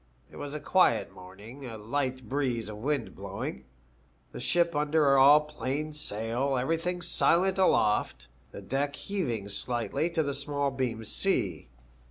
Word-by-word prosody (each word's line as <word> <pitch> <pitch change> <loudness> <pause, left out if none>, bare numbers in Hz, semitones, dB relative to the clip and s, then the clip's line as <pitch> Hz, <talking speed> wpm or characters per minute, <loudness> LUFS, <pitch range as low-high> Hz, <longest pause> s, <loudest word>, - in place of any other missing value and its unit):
It - - -12
was 145 +1 -6
a - - -3
quiet 185 +4 +2
morning, 100 +9 -12
a 115 -2 -7
light 130 +3 -3
breeze 130 -5 -1
of 105 - -7
wind 135 +1 -2
blowing, 65 0 -6 0.7
the - - -8
ship 170 -2 +1
under 150 -1 +3
all 145 +3 +8
plain 150 0 -4
sail, 125 0 -1
everything 165 +6 -1
silent 185 +2 +3
aloft, 105 - +2 0.2
the - - -9
deck 140 +2 -1
heaving 125 - -3
slightly 120 +9 -1
to 165 -2 0
the 140 -1 -2
small 140 0 -1
beam 125 -4 -2
sea. 110 - -1
140 Hz, 145 wpm, -29 LUFS, 115-150 Hz, 0.7 s, all